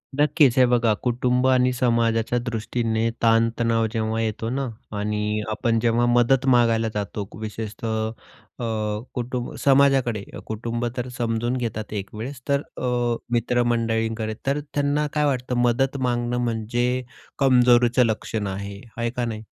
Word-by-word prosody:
नक्कीच, 145 -3 +4
हे 130 - +7
बघा 120 -2 +3
कुटुंब 125 +1 +1
आणि 130 -1 +4
समाजाच्या 115 -1 +1
दृष्टीने 115 -1 -1
ताण-तणाव 115 0 +3
जेव्हा 110 0 -1
येतो 110 0 -2
ना, 135 +2 -2 0.3
आणि 105 +1 -1
आपण 115 +1 0
जेव्हा 120 +1 +2
मदत 120 +2 +3
मागायला 115 -2 +3
जातो. 105 -1 -4
विशेषतः 110 0 -3 0.5
अ, - - -3 0.5
कुटुंब 125 0 -3
समाजाकडे 135 -6 +3 0.2
कुटुंब 115 +2 -3
तर 125 0 -2
समजून 120 +1 -1
घेतात 110 -3 -4
एक 100 -2 -4
वेळेस. 125 +4 -6
तर 140 0 +2 0.2
अ, - - -5 0.5
मित्र-मंडळींकडे 115 -2 0
तर 140 +2 +1
त्यांना 145 +1 +1
काय 150 -1 +2
वाटतं 125 -3 -1
मदत 130 +3 +1
मागणं, 120 0 -1
म्हणजे 120 +2 -1 0.4
कमजोरीचं 125 -2 +5
लक्षण 110 -1 -2
आहे. 100 +1 -6 0.2
आहे 115 0 0
का 125 0 -2
नाही? 110 -2 -5
120 Hz, 130 wpm, -23 LUFS, 110-125 Hz, 0.5 s, हे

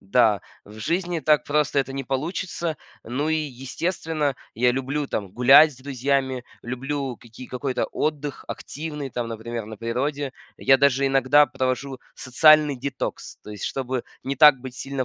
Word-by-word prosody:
Да, 105 0 +3 0.2
в 105 +2 -13
жизни 175 - -1
так 150 +1 +3
просто 145 -1 +1
это 135 0 -5
не 135 -1 -4
получится. 165 +4 -3 0.3
Ну 135 +7 -2
и, - - +2 0.3
естественно, 155 -1 -2 0.2
я 125 +2 +3
люблю 135 +3 -2
там 100 -3 -4
гулять 135 +5 +7
с 130 - -17
друзьями, 130 -1 -1 0.2
люблю 130 +1 -4
какие 120 +2 -12
какой-то 130 0 -2
отдых 145 -2 -2
активный 150 -2 -6
там, 120 -1 -3
например, 115 0 -5
на 110 -1 -8
природе. 135 +5 -2 0.3
Я 135 - +5
даже 140 0 +3
иногда 135 +2 +5
провожу 130 +1 -2 0.2
социальный 150 +3 +5
детокс. 135 +1 -5
То - - -10
есть, 105 -2 -6
чтобы 130 -2 -3 0.2
не 135 +1 -3
так 150 0 +8
быть 130 -1 -8
сильно 135 -1 -3
135 Hz, 155 wpm, -24 LUFS, 125-145 Hz, 0.3 s, так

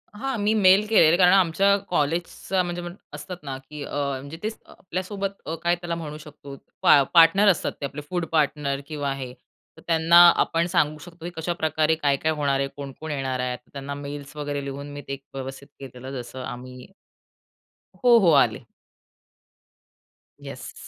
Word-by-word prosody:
हा, 265 +4 -3
मी 210 +1 +1
मेल 195 0 +5
केलेले. 170 -6 +5
कारण 180 0 +6
आमच्या 195 +2 +4
कॉलेजचा 170 +4 -1
म्हणजे 175 0 -4 0.3
असतात 150 +5 -7
ना, 135 -2 -5
की 145 +2 -9
म्हणजे 140 +1 -4
ते 215 - 0 0.2
आपल्यासोबत 195 +2 -5 0.2
काय 175 0 +3
त्याला 175 -1 -4
म्हणू 155 -3 -6
शकतो 145 -2 -11 0.3
पा 145 - +7
पार्टनर 170 +4 +6
असतात 180 - +1
ते - - -1
आपले 140 +2 -6
फूड 175 -2 -1
पार्टनर 145 -3 0
किंवा 145 -3 -3
हे, 130 -2 -7 0.4
तर - - -14
त्यांना 165 0 +4 0.2
आपण 165 +1 +1
सांगू 155 -3 +1
शकतो, 170 +1 -12
की - - -3
कशाप्रकारे 160 -1 0
काय-काय 150 0 0
होणार 145 -3 0
आहे, 135 - 0
कोण-कोण 145 +2 -7
येणार 135 -3 -2
आहेत. 125 0 -2
तर - - -31
त्यांना 140 0 -6
मेल्स 145 0 -8
वगैरे 145 -1 -4
लिहून 140 +1 -6
मी 145 - -7
ते 140 - -4 0.2
व्यवस्थित 135 +1 -7
केलेलं 130 -1 -9
जसं 130 +2 -9
आम्ही. 125 0 -8 1.1
हो, 245 -1 +5
हो 180 -6 +4
आले. - - -1 1.8
येस. - - -8
150 Hz, 160 wpm, -24 LUFS, 140-175 Hz, 1.8 s, पा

